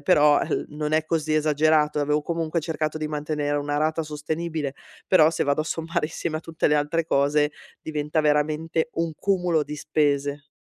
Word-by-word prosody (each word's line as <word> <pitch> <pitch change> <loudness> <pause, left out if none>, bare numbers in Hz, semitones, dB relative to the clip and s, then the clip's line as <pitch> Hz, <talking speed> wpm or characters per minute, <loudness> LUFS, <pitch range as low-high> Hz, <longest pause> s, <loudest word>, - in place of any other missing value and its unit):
però 150 -5 +5
el - - -2
non 150 +1 -4
è 155 0 +2
così 155 -1 0
esagerato 155 0 +2
e - - +2
avevo 150 +1 +1
comunque 165 0 -1
cercato 155 -1 -2
di 155 -1 -3
mantenere 150 -1 -2
una 145 0 -1
rata 155 +1 0
sostenibile. 155 -1 -3 0.3
Però, 160 -5 +6
se 165 - -1
vado 140 +2 +1
a - - -10
sommare 165 0 -2
insieme 160 0 -4
a - - -4
tutte 165 0 -1
le 150 - +3
altre 150 +3 0
cose 145 0 +2 0.3
diventa 150 0 -1
veramente 155 +2 0
un 165 -1 -2
cumulo 180 -5 +1
di 150 +1 -6
spese. 145 -1 0
155 Hz, 180 wpm, -24 LUFS, 150-160 Hz, 0.3 s, Però